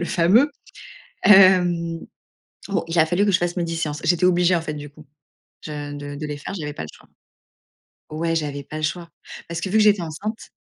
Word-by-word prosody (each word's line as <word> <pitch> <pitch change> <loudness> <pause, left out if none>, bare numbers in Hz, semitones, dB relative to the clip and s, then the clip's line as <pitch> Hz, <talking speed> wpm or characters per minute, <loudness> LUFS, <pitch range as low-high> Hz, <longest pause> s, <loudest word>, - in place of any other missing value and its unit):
le 175 - -1
fameux, 195 - +3 0.7
hem, 180 -4 +5 0.7
o 195 - 0
il 165 +1 -3
a 160 - +6
fallu 180 +5 +1
que 205 - +2
je 185 - +4
fasse 175 +1 -2
mes 175 - 0
10 165 0 -3
séances. 150 -1 -3
J'étais 175 +1 +2
obligée 180 0 +3
en 165 - 0
fait 155 -2 -5
du 145 -1 -8
coup 150 +1 -17 0.6
je 145 -1 -6
de 145 0 -7
de 150 +1 -5
les 145 -1 -5
faire, 145 - -7
j'avais 150 -4 -5
pas 80 - -6
le 80 - -8
choix. - - -20 1.0
Ouais, 165 +2 -2
j'avais 145 -3 -3
pas 155 - -8
le 155 - -6
choix 170 +2 -3 0.4
parce 170 0 -4
que 190 - -2
vu 215 - +3
que 215 - +5
j'étais 205 -3 +4
enceinte 200 +8 -6
165 Hz, 220 wpm, -22 LUFS, 150-180 Hz, 1.0 s, a